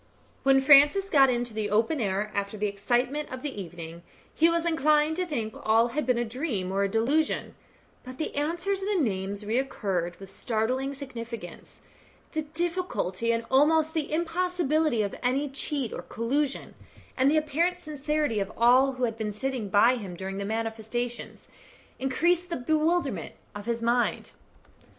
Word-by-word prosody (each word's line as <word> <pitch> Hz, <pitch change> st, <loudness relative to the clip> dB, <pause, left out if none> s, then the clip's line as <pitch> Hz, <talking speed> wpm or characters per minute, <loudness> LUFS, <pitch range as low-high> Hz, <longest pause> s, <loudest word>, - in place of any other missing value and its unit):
When 270 Hz, 0 st, +4 dB
Francis 290 Hz, +8 st, +6 dB
got 275 Hz, -3 st, +6 dB
into 240 Hz, -2 st, -1 dB
the 215 Hz, -1 st, -2 dB
open 225 Hz, +8 st, +1 dB
air 205 Hz, +1 st, -1 dB
after 200 Hz, +1 st, -3 dB
the 210 Hz, -, -1 dB
excitement 245 Hz, +8 st, -1 dB
of 260 Hz, 0 st, -7 dB
the 270 Hz, -9 st, -4 dB
evening, 170 Hz, -1 st, -9 dB, 0.3 s
he 325 Hz, +2 st, +4 dB
was 335 Hz, 0 st, 0 dB
inclined 305 Hz, -1 st, +3 dB
to 365 Hz, -1 st, -1 dB
think 230 Hz, -9 st, -3 dB
that -, -, -11 dB
all 225 Hz, +2 st, +3 dB
had 300 Hz, +4 st, -2 dB
been 250 Hz, -2 st, +3 dB
a 240 Hz, -, 0 dB
dream 225 Hz, -, -3 dB
or 195 Hz, +1 st, 0 dB
a 200 Hz, -, +1 dB
delusion, 270 Hz, +9 st, 0 dB, 0.5 s
but 255 Hz, 0 st, -9 dB
the 310 Hz, -, -3 dB
answer 335 Hz, +6 st, -1 dB
and 395 Hz, -, 0 dB
the 400 Hz, +1 st, -1 dB
names 200 Hz, -, -2 dB
recurred 200 Hz, -7 st, -1 dB
with 195 Hz, -1 st, -11 dB
startling 250 Hz, +7 st, -1 dB
significance; 235 Hz, -8 st, -8 dB, 0.5 s
the 315 Hz, -, -1 dB
difficulty 310 Hz, -, -1 dB
and 230 Hz, 0 st, -1 dB
almost 310 Hz, +3 st, +4 dB
the 310 Hz, -3 st, -2 dB
impossibility 325 Hz, -6 st, +1 dB
of 200 Hz, -, -3 dB
any 265 Hz, +4 st, +1 dB
cheat 275 Hz, -2 st, -3 dB
or -, -, -5 dB
collusion, 275 Hz, +5 st, -2 dB, 0.4 s
and 265 Hz, +1 st, +3 dB
the 310 Hz, -, +3 dB
apparent 315 Hz, +4 st, +1 dB
sincerity 300 Hz, -6 st, -1 dB
of 195 Hz, +1 st, -3 dB
all 255 Hz, +3 st, +5 dB
who 255 Hz, 0 st, -5 dB
had 225 Hz, -2 st, -1 dB
been 215 Hz, -1 st, -2 dB
sitting 240 Hz, 0 st, -3 dB
by 230 Hz, +6 st, +5 dB
him 195 Hz, -6 st, -7 dB
during 195 Hz, +2 st, -5 dB
the 200 Hz, -, -3 dB
manifestations, 225 Hz, +2 st, -4 dB, 0.5 s
increased 345 Hz, +7 st, +1 dB
the 340 Hz, -, -2 dB
bewilderment 315 Hz, +6 st, 0 dB, 0.2 s
of 205 Hz, +1 st, -8 dB
his 230 Hz, 0 st, -1 dB
mind. 240 Hz, +1 st, 0 dB
255 Hz, 165 wpm, -27 LUFS, 220-305 Hz, 0.5 s, Francis